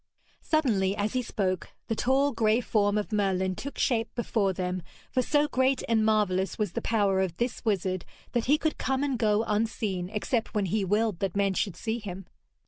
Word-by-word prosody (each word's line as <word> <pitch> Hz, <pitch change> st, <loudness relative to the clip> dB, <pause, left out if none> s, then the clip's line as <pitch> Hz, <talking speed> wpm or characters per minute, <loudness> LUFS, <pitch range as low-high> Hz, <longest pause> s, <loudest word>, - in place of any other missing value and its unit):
Suddenly, 215 Hz, -12 st, +1 dB
as 210 Hz, +2 st, -1 dB
he 255 Hz, -, +1 dB
spoke, 185 Hz, -7 st, -2 dB
the 225 Hz, -, 0 dB
tall 270 Hz, +5 st, +2 dB
grey 220 Hz, -2 st, +2 dB
form 210 Hz, -3 st, +1 dB
of 210 Hz, +1 st, -2 dB
Merlin 190 Hz, -3 st, +1 dB
took 280 Hz, +7 st, -7 dB
shape 230 Hz, -3 st, +1 dB
before 220 Hz, -4 st, +1 dB
them, 180 Hz, 0 st, -2 dB, 0.3 s
for 255 Hz, -, +2 dB
so 295 Hz, +3 st, +2 dB
great 260 Hz, -1 st, +1 dB
and 225 Hz, -1 st, +3 dB
marvellous 195 Hz, -4 st, +1 dB
was 210 Hz, -5 st, -1 dB
the -, -, -3 dB
power 200 Hz, -4 st, +2 dB
of 180 Hz, -3 st, -2 dB
this 240 Hz, +1 st, -2 dB
wizard, 185 Hz, -4 st, 0 dB, 0.3 s
that 240 Hz, -1 st, 0 dB
he 290 Hz, +4 st, +4 dB
could 315 Hz, 0 st, -1 dB
come 265 Hz, +1 st, 0 dB
and 280 Hz, -2 st, 0 dB
go 215 Hz, -1 st, +3 dB
unseen, 210 Hz, -4 st, -1 dB
except 220 Hz, +2 st, -2 dB
when 205 Hz, -2 st, +2 dB
he 205 Hz, +3 st, 0 dB
willed 210 Hz, 0 st, +1 dB
that 195 Hz, -2 st, -2 dB
men 200 Hz, -1 st, +2 dB
should 190 Hz, -1 st, -1 dB
see 225 Hz, +1 st, -3 dB
him. 195 Hz, -3 st, -7 dB
215 Hz, 195 wpm, -28 LUFS, 190-240 Hz, 0.3 s, he